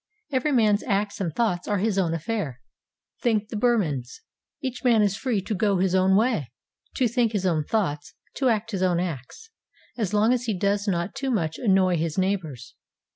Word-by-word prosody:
Every 270 +2 +1
man's 215 -5 +3
acts 200 -2 -1
and 175 -4 -1
thoughts 180 -2 -1
are 205 - +1
his 200 0 0
own 165 -3 +1
affair, 165 - -3 0.6
think 220 -3 +1
the - - -6
Burmans; 195 - 0 0.4
each 260 -2 -5
man 230 -4 +4
is 200 -2 +1
free 225 -4 -1
to 215 - -3
go 200 0 +1
his 185 0 +1
own 190 0 +4
way, 210 - +1 0.4
to 255 - +2
think 235 -1 +1
his 195 -3 -1
own 160 -5 +1
thoughts, 150 -8 -2 0.2
to 265 -2 +2
act 225 0 0
his 195 -3 -2
own 180 -2 +2
acts, 175 - -6 0.5
as 210 -5 -1
long 215 +3 +3
as 245 -1 -1
he 220 -5 -1
does 200 +2 0
not 175 -1 -1
too 270 0 -3
much 165 -10 -1
annoy 190 -5 +3
his 160 +1 -2
neighbours. 180 -10 -2
200 Hz, 190 wpm, -25 LUFS, 175-225 Hz, 0.6 s, man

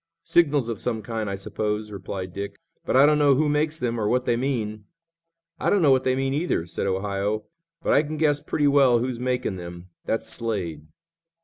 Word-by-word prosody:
"Signals 145 -7 +3
of 115 -4 -4
some 115 -3 -2
kind, 110 -2 -3
I 100 - -2
suppose," 105 +1 -3
replied 95 -2 -6
Dick, 100 +2 -5 0.3
"but - - +2
I 135 - +8
don't 150 0 +4
know 145 -2 +5
who 150 +3 +2
makes 150 +1 0
them 120 -2 -1
or 105 - 0
what 125 +3 +1
they 120 - +2
mean." 110 -5 -2 0.7
"I - - +1
don't 200 -4 +3
know 145 - +6
what 130 -1 +3
they 130 0 +2
mean, 135 0 0
either," 150 - 0
said 90 +3 -3
Ohio; 100 +2 -1 0.4
"but - - +2
I - - +6
can 155 +1 -5
guess 145 -2 +2
pretty 145 -1 0
well 140 -4 +5
who's 120 0 -2
making 125 -5 -1
them. 85 0 -9 0.2
That's 115 - -1
Slade." 90 -10 -3
115 Hz, 205 wpm, -25 LUFS, 100-140 Hz, 0.7 s, I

